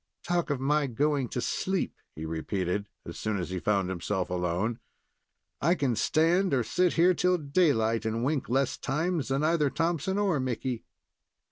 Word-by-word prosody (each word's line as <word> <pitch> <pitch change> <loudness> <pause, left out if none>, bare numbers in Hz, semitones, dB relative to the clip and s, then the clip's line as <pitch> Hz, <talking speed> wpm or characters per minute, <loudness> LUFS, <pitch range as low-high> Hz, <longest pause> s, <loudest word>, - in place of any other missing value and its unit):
"Talk 175 -2 0
of 145 -3 0
my 145 +2 +2
going 140 +1 0
to - - -3
sleep," 190 +8 -1 0.2
he 80 - -6
repeated, 90 +5 -2 0.2
as 85 - -8
soon 110 -2 -1
as 90 -1 -4
he 95 - -2
found 100 -1 +1
himself 95 0 -2
alone. 90 +6 -1 0.8
"I 170 +5 +3
can 135 -8 0
stand 165 - +2
or 125 - +2
sit 180 +10 +1
here 175 +2 +5
till 180 +1 +2
daylight, 140 -8 +2
and 110 +1 -1
wink 140 -3 -1
less 135 +1 +1
times 160 +3 -1
than 135 +2 0
either 155 -2 +3
Thompson 170 +4 -1
or 195 -8 +2
Mickey." 125 -1 -3
135 Hz, 165 wpm, -28 LUFS, 110-165 Hz, 0.8 s, here